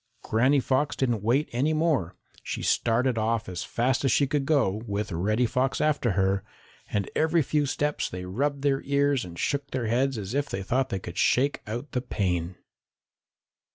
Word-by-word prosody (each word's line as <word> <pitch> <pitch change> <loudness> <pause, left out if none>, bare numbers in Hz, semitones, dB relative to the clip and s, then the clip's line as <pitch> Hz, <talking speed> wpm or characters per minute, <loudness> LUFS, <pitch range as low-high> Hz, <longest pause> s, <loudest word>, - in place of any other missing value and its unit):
Granny 130 +6 +3
Fox 135 +3 0
didn't 120 -5 0
wait 125 +8 +1
for - - -10
any 150 +5 +2
more. 150 - +1 0.3
She - - -5
started 120 +1 +2
off 110 0 0
as 90 -2 -4
fast 130 +3 0
as 135 - +3
she 140 - +4
could 140 0 -1
go, 110 -10 +2
with 105 0 -2
Reddy 105 +8 +1
Fox 130 +3 0
after 145 -8 +1
her, 95 0 +1 0.5
and 100 -2 -1
every 160 0 +3
few 145 +2 0
steps 145 +2 -1
they 90 0 -6
rubbed 140 +9 -1
their 140 -1 +2
ears 140 -1 +1
and 85 -2 -9
shook 140 +6 -1
their 130 -3 -2
heads 125 +3 +1
as 100 +1 -5
if 145 +1 0
they 95 - -3
thought 130 +6 0
they 100 - -2
could 90 0 -6
shake 140 +3 +2
out 120 +7 -5
the 125 - -1
pain. 90 -7 -2
125 Hz, 190 wpm, -27 LUFS, 105-140 Hz, 0.5 s, she